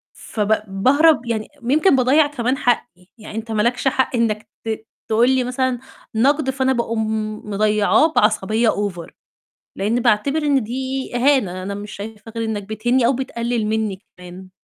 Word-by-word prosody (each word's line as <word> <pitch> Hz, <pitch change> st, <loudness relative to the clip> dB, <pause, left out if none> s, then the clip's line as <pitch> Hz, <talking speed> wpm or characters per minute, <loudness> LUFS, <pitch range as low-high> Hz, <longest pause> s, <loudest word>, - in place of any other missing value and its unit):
فب 215 Hz, -1 st, -1 dB
باهرب 260 Hz, +8 st, +3 dB
يعني 225 Hz, -2 st, -2 dB, 0.2 s
يمكن 290 Hz, +7 st, +3 dB
باضيّع 265 Hz, +4 st, +4 dB
كمان 260 Hz, -2 st, -1 dB
حقّي، 225 Hz, -7 st, -1 dB
يعني 215 Hz, -1 st, -10 dB
أنت 225 Hz, 0 st, -5 dB
ما 215 Hz, -1 st, +1 dB
لكش 245 Hz, +4 st, 0 dB
حق 260 Hz, -1 st, +1 dB
إنك 220 Hz, -2 st, 0 dB, 0.2 s
ت 220 Hz, 0 st, -4 dB, 0.2 s
تقول 230 Hz, +3 st, +3 dB
لي 260 Hz, -1 st, +2 dB
مثلًا 250 Hz, 0 st, -1 dB, 0.4 s
نقد 275 Hz, +5 st, +2 dB
فأنا 265 Hz, 0 st, +1 dB
باقوم 220 Hz, -3 st, -2 dB
مضيّعاه 215 Hz, +9 st, +2 dB
بعصبية 215 Hz, +2 st, +2 dB
over، 195 Hz, -6 st, -2 dB, 0.7 s
لإني 215 Hz, +5 st, 0 dB
باعتبر 240 Hz, +6 st, +2 dB
إن 285 Hz, -3 st, +2 dB
دي 260 Hz, +4 st, -4 dB
إهانة، 240 Hz, -9 st, +2 dB
أنا 200 Hz, +2 st, -4 dB
مش 205 Hz, +1 st, -7 dB
شايفة 215 Hz, +2 st, -9 dB
غير 230 Hz, -, -1 dB
إنك 220 Hz, -2 st, -3 dB
بتهينني 235 Hz, +4 st, 0 dB
أو 250 Hz, -, +4 dB
بتقلل 235 Hz, -3 st, -2 dB
منّي 215 Hz, -3 st, -2 dB, 0.2 s
كمان. 180 Hz, +1 st, -11 dB
230 Hz, 155 wpm, -20 LUFS, 210-260 Hz, 0.7 s, باضيّع